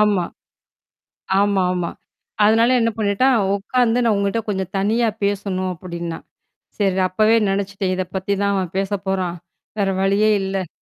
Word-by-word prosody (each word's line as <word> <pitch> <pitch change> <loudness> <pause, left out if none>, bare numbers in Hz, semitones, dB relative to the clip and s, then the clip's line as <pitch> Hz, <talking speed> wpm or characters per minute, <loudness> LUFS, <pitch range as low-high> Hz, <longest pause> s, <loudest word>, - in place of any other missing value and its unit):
ஆமா. 205 -4 +3 1.2
ஆமாமா. 185 -3 +1 0.6
அதனால 225 +3 +4
என்ன 230 - +2
பண்ணிட்டான் 220 +5 +2 0.2
உட்காந்து 240 +3 +1
நான் 225 -3 +3
உங்கட்ட 200 +3 0
கொஞ்சம் 190 -2 -3
தனியா 220 +4 +1 0.2
பேசணும் 195 -2 -1
அப்படின்னா. 170 -1 -6 0.6
சேரி. 195 -2 +1
அப்பவே 215 +4 +3
நினச்சுட்டேன். 195 -1 -1
இத 185 - -1
பத்தி 190 +1 -1
தான் 200 0 +1
அவன் 185 -3 -2
பேச 195 +1 -1 0.2
போறான். 185 -2 -1 0.4
வேற 195 -1 +2
வழியே 200 +2 +3
இல்ல. 190 -2 -2
195 Hz, 135 wpm, -20 LUFS, 185-210 Hz, 1.2 s, அதனால